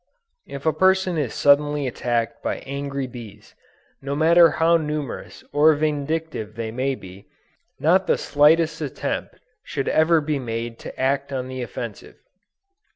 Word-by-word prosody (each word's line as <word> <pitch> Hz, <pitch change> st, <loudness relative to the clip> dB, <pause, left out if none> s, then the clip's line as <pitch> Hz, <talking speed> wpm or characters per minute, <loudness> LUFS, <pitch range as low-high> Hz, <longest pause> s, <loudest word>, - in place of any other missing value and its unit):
If 140 Hz, +1 st, -8 dB
a 160 Hz, -, +3 dB
person 190 Hz, +2 st, +2 dB
is 135 Hz, -6 st, -1 dB
suddenly 145 Hz, 0 st, +3 dB
attacked 115 Hz, -2 st, -2 dB
by -, -, -2 dB
angry 140 Hz, 0 st, -4 dB
bees, 110 Hz, -4 st, -11 dB, 0.5 s
no 140 Hz, +1 st, -3 dB
matter 165 Hz, +2 st, +6 dB
how 165 Hz, +1 st, +3 dB
numerous 150 Hz, -4 st, -5 dB
or 155 Hz, +1 st, +5 dB
vindictive 150 Hz, -6 st, -2 dB
they 115 Hz, -1 st, -4 dB
may 130 Hz, +3 st, -1 dB
be, 95 Hz, -3 st, -13 dB, 0.5 s
not 185 Hz, +5 st, +3 dB
the -, -, +3 dB
slightest 155 Hz, +3 st, +3 dB
attempt 145 Hz, -4 st, -4 dB, 0.3 s
should 135 Hz, -, -4 dB
ever 160 Hz, +1 st, +4 dB
be 150 Hz, -1 st, -2 dB
made 115 Hz, -1 st, -5 dB
to -, -, -10 dB
act 135 Hz, +1 st, 0 dB
on 130 Hz, -2 st, -3 dB
the 130 Hz, 0 st, -5 dB
offensive. 120 Hz, -, -7 dB
140 Hz, 145 wpm, -23 LUFS, 125-155 Hz, 0.5 s, matter